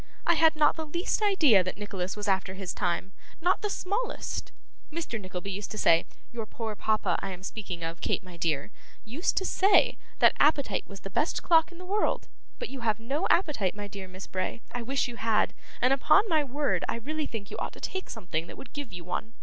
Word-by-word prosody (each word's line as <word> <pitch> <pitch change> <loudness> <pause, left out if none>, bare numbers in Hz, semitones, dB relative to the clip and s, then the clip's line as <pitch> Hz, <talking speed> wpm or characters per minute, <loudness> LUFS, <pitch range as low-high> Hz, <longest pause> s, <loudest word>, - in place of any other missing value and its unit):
I 340 - +5
had 320 -1 +5
not 305 +1 +4
the 320 - -3
least 345 +7 -1
idea 315 - +5
that 185 - -4
Nicholas 195 -2 -4
was 210 0 -3
after 190 -1 +1
his 190 -2 -4
time, 180 0 -1 0.3
not 355 +3 +2
the 420 - -1
smallest. 405 +5 -2 0.4
Mr. 300 -9 -3
Nickleby 185 0 -5
used 200 +1 -4
to 215 - -6
say 165 -5 +5 0.3
your 225 -2 -4
poor 220 -1 -4
papa, 210 -4 +1
I 195 - -3
am 185 -1 -7
speaking 190 -4 -5
of, 165 +2 -4
Kate - - 0
my 180 -1 -11
dear 160 0 -1 0.3
used 265 +11 -1
to 380 - +2
say, 390 +2 +4 0.2
that - - +6
appetite 290 -2 +3
was 195 -1 -10
the 195 - -7
best 305 - 0
clock 325 0 +5
in 345 - -12
the 365 - -9
world, 410 +3 0 0.3
but 485 - -4
you 270 - -6
have 220 -2 +1
no 275 +10 -1
appetite, 280 - +2
my 205 0 -5
dear 195 -1 -8
Miss 185 +1 -9
Bray, 185 +5 -3
I 245 - -3
wish 270 +4 0
you 240 -1 -7
had, 220 -2 +2 0.3
and 255 +2 +5
upon 395 +10 +5
my 315 -5 +3
word 285 +2 0
I - - 0
really 300 +6 -3
think 210 -3 -6
you - - -5
ought - - -3
to - - -12
take 380 0 -4
something 175 -7 -3
that - - -10
would 245 - -11
give 285 -3 -5
you 175 -1 -7
one. 225 +6 -4
225 Hz, 220 wpm, -29 LUFS, 190-310 Hz, 0.4 s, that